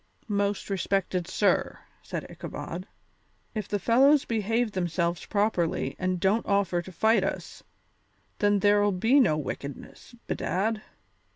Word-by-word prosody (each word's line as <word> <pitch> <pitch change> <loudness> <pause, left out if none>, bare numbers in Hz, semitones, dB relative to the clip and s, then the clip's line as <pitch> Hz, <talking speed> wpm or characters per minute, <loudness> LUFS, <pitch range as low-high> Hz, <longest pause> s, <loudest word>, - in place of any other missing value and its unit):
"Most 205 -1 -1
respected 190 -2 -1
sir," 200 +2 +1 0.2
said - - -5
Ichabod, - - -7 0.7
"if 215 -4 -4
the 205 - -1
fellows 265 +8 +4
behave 225 +1 0
themselves 170 -2 -1
properly 200 -5 0
and 185 -1 -1
don't 200 +5 +1
offer 195 -3 +1
to 185 - -11
fight 220 +3 +3
us, - - -4 0.8
then 205 0 +3
there'll 205 0 +4
be 225 +10 +4
no 155 - +4
wickedness, 140 - -7
bedad. 215 +4 -1
200 Hz, 120 wpm, -27 LUFS, 185-220 Hz, 0.8 s, fellows